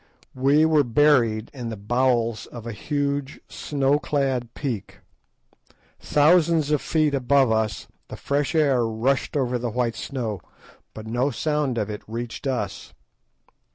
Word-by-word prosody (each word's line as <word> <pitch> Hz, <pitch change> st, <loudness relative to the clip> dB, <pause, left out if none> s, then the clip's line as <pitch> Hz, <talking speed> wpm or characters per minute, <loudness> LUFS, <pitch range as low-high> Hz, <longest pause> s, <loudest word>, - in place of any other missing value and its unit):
We 140 Hz, +4 st, +3 dB
were 155 Hz, -2 st, +4 dB
buried 120 Hz, -4 st, +2 dB
in 125 Hz, -4 st, -5 dB
the 110 Hz, -, -6 dB
bowels 120 Hz, +1 st, 0 dB
of 120 Hz, -2 st, -10 dB
a 115 Hz, -, -4 dB
huge 140 Hz, +4 st, -3 dB
snow 140 Hz, 0 st, 0 dB
clad 130 Hz, -4 st, -1 dB
peak. 120 Hz, -9 st, -4 dB, 1.0 s
Thousands 155 Hz, 0 st, +3 dB
of 150 Hz, -, +2 dB
feet 155 Hz, -2 st, +1 dB
above 135 Hz, -1 st, +3 dB
us 110 Hz, -2 st, -1 dB, 0.2 s
the -, -, -8 dB
fresh 145 Hz, +3 st, -1 dB
air 140 Hz, -6 st, +3 dB
rushed 115 Hz, +6 st, 0 dB
over 125 Hz, -2 st, 0 dB
the 120 Hz, 0 st, -2 dB
white 120 Hz, 0 st, -1 dB
snow, 115 Hz, -8 st, -4 dB, 0.5 s
but 110 Hz, -, -8 dB
no 120 Hz, +5 st, 0 dB
sound 150 Hz, -2 st, -1 dB
of 105 Hz, -1 st, -2 dB
it 105 Hz, -, -6 dB
reached 115 Hz, +4 st, -5 dB
us. 110 Hz, -7 st, -4 dB
130 Hz, 140 wpm, -24 LUFS, 115-145 Hz, 1.0 s, were